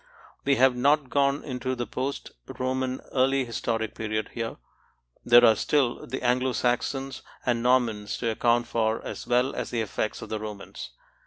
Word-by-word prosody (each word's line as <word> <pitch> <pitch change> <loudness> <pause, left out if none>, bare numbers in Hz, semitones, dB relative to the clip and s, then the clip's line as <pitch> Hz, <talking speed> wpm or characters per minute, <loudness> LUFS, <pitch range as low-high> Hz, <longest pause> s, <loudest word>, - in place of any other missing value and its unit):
We 140 0 +4
have 130 -1 +4
not 140 +2 +2
gone 140 0 +2
into 130 -1 -3
the 120 -1 -3
post 130 +5 -4 0.2
Roman 130 0 -2
early 135 0 +2
historic 115 -2 -2
period 110 -1 -3
here; 115 -1 -4 0.7
there 120 0 +7
are 110 - +7
still 135 -2 0
the 130 +2 -5
Anglo 125 +1 +2
Saxons 135 +3 -1 0.2
and 120 -2 +1
Normans 120 -4 +1
to 115 -2 -1
account 120 +1 +2
for 115 -1 -1
as - - -6
well 125 +2 +2
as - - -4
the 115 - -1
effects 110 0 -3
of - - -9
the 110 - -2
Romans. 105 - -7
125 Hz, 165 wpm, -26 LUFS, 115-130 Hz, 0.7 s, there